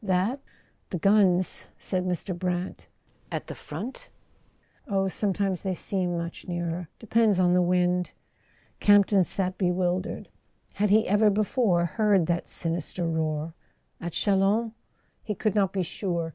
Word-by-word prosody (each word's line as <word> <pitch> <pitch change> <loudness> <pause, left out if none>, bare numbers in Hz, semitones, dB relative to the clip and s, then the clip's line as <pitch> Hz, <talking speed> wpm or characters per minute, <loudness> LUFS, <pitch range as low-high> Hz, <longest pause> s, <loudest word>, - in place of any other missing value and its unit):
"That? 195 +7 +1 0.5
The 180 - -2
guns 190 -1 +3
" - - -38
said 185 -1 0
Mr. 180 +1 -2
Brant. 180 0 -3 0.4
"At - - -3
the - - -7
front?" 200 - -8 0.8
"Oh, 195 -3 +1
sometimes 195 -1 -1
they 190 -2 -2
seem 180 -2 -1
much 170 0 -6
nearer. 175 -1 -3
Depends 220 -3 +2
on 180 -1 +4
the 180 - +4
wind." 180 0 +1 0.7
Camp 205 -1 +6
ton 195 -2 +3
sat 185 +1 -2
bewildered. 180 +1 -1 0.4
Had 210 +1 +1
he 215 +2 +4
ever 210 +2 +4
before 205 -3 +2
heard 200 +1 +2
that 170 +1 -1
sinister 170 +1 -1
roar? 160 -1 -2 0.5
At 170 -1 -5
Chalons? 205 +3 +2 0.5
He 210 - -4
could 215 +1 0
not 200 -3 +2
be 190 -2 -1
sure. 170 -2 -3
185 Hz, 145 wpm, -27 LUFS, 175-205 Hz, 0.8 s, Camp